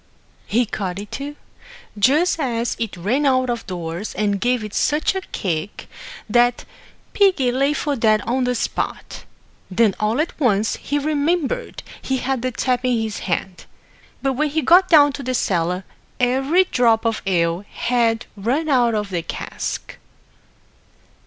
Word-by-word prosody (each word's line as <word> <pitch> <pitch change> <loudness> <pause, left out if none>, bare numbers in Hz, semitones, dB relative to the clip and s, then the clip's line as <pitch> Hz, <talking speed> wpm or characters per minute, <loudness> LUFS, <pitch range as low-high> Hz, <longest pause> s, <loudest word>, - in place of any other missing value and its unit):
He 240 +3 +2
caught 190 -4 -4
it, 205 +1 -8
too, 285 +1 -5 0.6
just 295 - +3
as 235 -4 -1
it 225 -5 -3
ran 225 +12 0
out 255 -3 +2
of 235 -3 -5
doors, 175 +1 -5
and 205 -2 0
gave 245 -2 +1
it 210 -1 -7
such 300 +5 +1
a 380 - -3
kick, 180 - -4 0.4
that 240 +2 +2 0.5
piggy 365 -12 +3
lay 275 +3 +1
for 295 -1 -1
dead 215 -3 +3
on 250 +2 0
the 250 0 0
spot. - - -4 0.4
Then 205 +2 +3
all 215 +5 0
at 315 - 0
once 220 -6 +2
he 290 - -2
remembered 310 - -1 0.2
he 265 - -1
had 260 -1 -2
the 255 - 0
tap 250 0 -1
in 250 -2 +1
his 220 -1 -3
hand; 180 +1 -3 0.6
but 270 -1 +1
when 300 +4 0
he 310 +1 -1
got 370 +2 +5
down 290 -4 +6
to 280 - -6
the 255 -1 -2
cellar, 180 -3 0 0.4
every 270 +8 +3
drop 235 -8 +2
of 225 -1 0
ale 170 0 +1
had 235 -2 0
run 255 +10 -1
out 240 -4 +3
of 210 -2 -2
the 175 -2 -1
cask. 165 - -5
245 Hz, 160 wpm, -21 LUFS, 210-280 Hz, 0.6 s, down